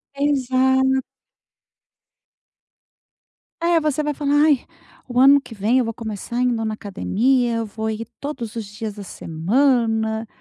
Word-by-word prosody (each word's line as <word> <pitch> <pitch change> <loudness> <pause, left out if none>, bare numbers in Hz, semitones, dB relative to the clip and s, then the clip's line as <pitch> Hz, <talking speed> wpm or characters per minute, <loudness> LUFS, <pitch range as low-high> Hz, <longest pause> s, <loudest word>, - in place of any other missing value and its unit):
Exa 265 -2 +2 2.8
Eh, 340 0 +4
você 305 -1 0
vai 295 0 -1
falar: 285 -1 -1
“Ai, 290 -5 +2 0.4
o 245 -1 -1
ano 275 +2 +7
que 250 - -12
vem 220 +5 +1
eu 255 - +2
vou 225 - -3
começar 225 +2 -4
indo 235 -3 +1
na 215 - -2
academia, 230 +4 0
eu 230 - -2
vou 220 +1 -4
ir 220 +1 -5
todos 265 -7 -5
os 225 -2 -4
dias 210 +1 -6
da 205 - -8
semana.”, 220 - 0
235 Hz, 140 wpm, -21 LUFS, 220-270 Hz, 2.8 s, ano